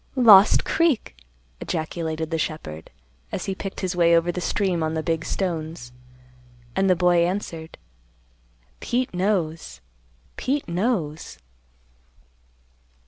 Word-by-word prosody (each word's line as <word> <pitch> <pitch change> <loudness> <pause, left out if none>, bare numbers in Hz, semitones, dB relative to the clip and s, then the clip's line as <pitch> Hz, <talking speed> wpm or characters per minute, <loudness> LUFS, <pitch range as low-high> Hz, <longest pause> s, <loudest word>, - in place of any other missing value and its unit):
"Lost 215 -6 +7
Creek!" 320 - +1 0.4
ejaculated 160 -1 -3
the 165 - -1
shepherd, 80 - -5 0.4
as - - -4
he 195 - -2
picked 195 0 -6
his 185 -1 -2
way 170 -1 +5
over 170 +1 +1
the 180 - -5
stream 180 -2 0
on 160 0 -1
the 160 - -2
big 165 0 -1
stones. 160 -9 -4 0.8
And 195 0 +2
the 185 - +5
boy 175 0 +3
answered, 170 -3 -4 1.0
"Pete 250 -2 -1
knows. 175 - -1 0.6
Pete 280 +2 -1
knows." 170 -4 -2
175 Hz, 115 wpm, -23 LUFS, 160-195 Hz, 1.0 s, Lost